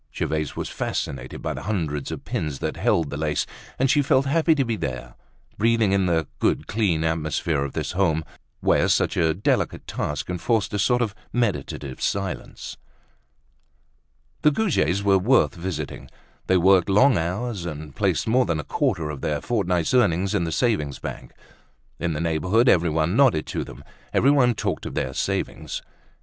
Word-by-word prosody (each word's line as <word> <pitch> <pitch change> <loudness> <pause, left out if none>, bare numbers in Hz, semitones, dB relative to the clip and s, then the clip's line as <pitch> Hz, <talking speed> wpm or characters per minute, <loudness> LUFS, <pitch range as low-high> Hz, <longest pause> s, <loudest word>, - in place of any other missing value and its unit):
Gervaise 75 -2 -2
was - - -3
fascinated 65 -2 -4
by - - -1
the - - -6
hundreds 80 -9 -2
of - - -6
pins 75 -3 -3
that - - -3
held 80 -4 +1
the 70 - -4
lace, 75 -1 0 0.3
and 135 - +2
she 145 +3 +4
felt 135 0 +3
happy 160 +3 +3
to 135 -3 +1
be 115 -1 -1
there, 65 - -5 0.5
breathing 115 -2 +3
in 95 -1 +2
the 80 -2 +1
good - - +1
clean 95 -8 0
atmosphere 80 -2 0
of 70 - -5
this - - -3
home 85 -4 +1 0.4
where - - +3
such - - +2
a 80 -2 +2
delicate 100 - 0
task 75 - -3
enforced 95 +4 0
a 105 - 0
sort 125 +5 +3
of 105 -4 -3 0.2
meditative 100 - -2
silence. 95 -3 -3 1.6
The 150 - +6
Goujets 140 - +1
were 100 -1 +4
worth 120 +7 +3
visiting. 85 -5 -5 0.4
They 95 - +4
worked 95 +1 +4
long 125 +8 +5
hours, 90 +3 -2
and 75 -3 -7
placed - - 0
more 125 +1 +3
than 85 -3 0
a - - -3
quarter 75 +2 -1
of 70 - -7
their 75 -1 -1
fortnight's 90 - 0
earnings 95 -5 +3
in 95 -5 +1
the 80 - -3
savings 80 - 0
bank. - - -7 0.7
In 85 -1 -1
the 75 - -3
neighborhood 90 - +2
everyone 85 -2 +3
nodded 125 - +4
to - - -3
them, - - -11 0.3
everyone 130 -3 +4
talked - - -2
of - - -7
their 65 - -2
savings. - - -3
90 Hz, 170 wpm, -24 LUFS, 80-115 Hz, 1.6 s, The